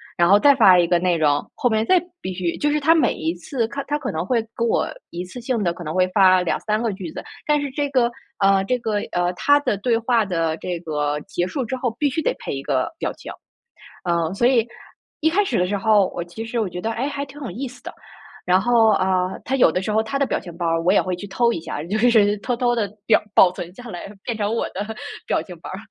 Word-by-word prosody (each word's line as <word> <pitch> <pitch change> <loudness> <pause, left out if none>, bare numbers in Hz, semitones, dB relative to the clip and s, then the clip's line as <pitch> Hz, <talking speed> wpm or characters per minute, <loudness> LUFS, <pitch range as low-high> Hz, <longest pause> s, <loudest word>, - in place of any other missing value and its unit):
然 170 0 +3
后 200 +1 +7
再 285 +6 +6
发 200 -8 +6
一 175 - +4
个 170 0 +2
内 180 -1 +1
容， 145 -2 +2
后 - - +1
面 220 0 +2
再 370 - +5 0.2
必 185 - -4
须 175 -2 -2
就 295 - +1
是 300 - +1
他 320 +3 +5
每 325 - +2
一 160 +1 -2
次 230 - -3
看 280 +4 -5
他 295 - 0
可 300 - -4
能 160 +1 -2
会 225 +3 0
跟 235 - 0
我 - - +1 0.2
一 175 +1 -5
次 185 +7 -9
性 235 -3 -1
地 170 -2 +1
可 175 - -9
能 155 +1 -5
会 185 0 +3
发 185 -1 +5
2-3 215 +5 -1
个 225 -4 0
句 185 -4 -7
子， - - -7 0.2
但 300 -1 +3
是 285 - -3
这 285 +1 -2
个 250 -3 +2 0.3
呃， 195 -1 +4
这 250 +5 +1
个， 220 -3 -1 0.2
呃， 175 0 +1
他 285 +10 +3
的 250 - 0
对 230 +3 +1
话 230 0 +2
的 165 -4 -1
这 175 +1 -4
个 150 -2 -2
结 175 +3 -3
束 260 +7 -3
之 245 - -3
后， 255 -1 -1
必 295 - +1
须 300 +4 -2
得 - - 0
配 - - -5
一 135 - -4
个 130 -1 -1
表 - - -1
情。 - - -10 0.8
嗯， 170 0 0
所 235 +5 +2
以 245 -4 +3 0.5
一 320 - +3
开 405 +5 +2
始 255 - -1
的 180 - +1
时 205 +2 -1
候， 205 -1 +3
我 175 - -2
其 175 +6 -8
实 230 +1 -3
我 205 - -1
觉 180 - -6
得： 225 - -2
哎， 245 +5 -2
还 280 0 -4
挺 285 +1 -13
有 260 - -5
意 255 +9 -5
思 250 0 -14
的。 - - -7 0.5
然 180 +1 +4
后， 230 0 +4
啊， 185 0 0
他 265 - 0
有 245 - +6
的 185 - -1
时 210 - -3
候 215 +1 +2
他 250 +5 -3
的 275 - +2
表 - - -1
情 175 -3 -11
包 175 - -3
儿 165 0 +1
我 180 +3 +3
也 - - +4
会 185 - -3
去 200 +3 -8
偷 235 +5 +2
一 200 - -3
下， 150 -2 -5
就 195 +6 -2
是 215 -3 +4
偷 245 +4 -2
偷 240 0 +1
地 215 -4 0 0.2
保 220 - +4
保 185 - +6
存 175 -1 -8
下 245 +1 -10
来， 180 -1 -7
变 235 -3 -3
成 210 +1 -1
我 - - 0
的 200 +3 -5 0.4
表 - - +1
情 180 -3 -11
包 - - -8
儿。 185 - -6
205 Hz, 290 characters per minute, -22 LUFS, 180-245 Hz, 0.8 s, 后